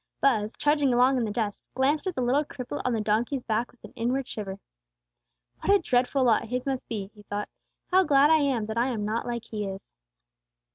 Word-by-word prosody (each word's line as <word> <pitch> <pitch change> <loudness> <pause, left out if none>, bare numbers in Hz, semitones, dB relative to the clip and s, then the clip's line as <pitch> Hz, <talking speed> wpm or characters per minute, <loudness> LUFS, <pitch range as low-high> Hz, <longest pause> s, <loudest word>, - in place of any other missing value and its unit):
Buz, 220 -6 +1
trudging 290 -2 +2
along 255 +2 +4
in 240 - +1
the - - -3
dust, 205 -1 -3
glanced 285 +7 +1
at 370 - -2
the 255 - -1
little 265 +5 +2
cripple 275 0 -6
on 250 - 0
the 225 - 0
donkey's 230 +5 0
back 225 +2 -1
with 250 - -29
an - - -11
inward 250 +3 -1
shiver. 195 -2 -6 1.0
"What - - +1
a 405 - +7
dreadful 260 -4 +1
lot 235 -1 +3
his 250 +2 -3
must 270 -2 -3
be," 205 -3 -4
he 210 - -15
thought. 205 0 -4 0.4
"How 375 +1 +6
glad 285 -2 +5
I 320 - +6
am 265 -7 +1
that 220 +2 -2
I 240 - +2
am 225 -5 -2
not 220 +3 -2
like 235 -1 -3
he 210 -2 -4
is!" 195 0 -7
245 Hz, 220 wpm, -27 LUFS, 215-275 Hz, 1.0 s, a